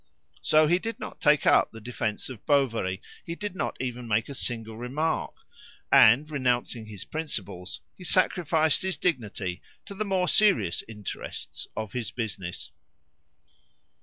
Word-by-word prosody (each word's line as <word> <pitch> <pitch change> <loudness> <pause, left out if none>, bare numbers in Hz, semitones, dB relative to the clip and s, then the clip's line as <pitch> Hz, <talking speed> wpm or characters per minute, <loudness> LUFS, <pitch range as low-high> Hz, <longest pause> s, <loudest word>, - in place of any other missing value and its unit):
So 155 0 +5
he 175 +4 +3
did 225 +2 -4
not - - -7
take 150 0 +4
up - - +5
the 115 - -10
defence 110 -2 -3
of 125 -6 -9
Bovary; 115 -10 +1 0.2
he 170 - -5
did 205 0 -5
not - - -2
even 125 -1 -4
make 110 +2 +1
a - - -5
single 115 -4 -2
remark, 135 +8 -2 0.6
and, 130 +7 +7
renouncing 125 -5 -1
his 105 -3 -7
principles, 100 - -4
he 185 - -12
sacrificed 165 -4 +3
his 190 -4 -1
dignity 105 - -2 0.2
to - - -8
the 205 +2 -2
more 190 -3 +1
serious 195 - +3
interests 105 -3 -6
of 110 -2 -3
his 120 -4 -2
business. 95 -7 -4
125 Hz, 145 wpm, -27 LUFS, 110-160 Hz, 0.6 s, and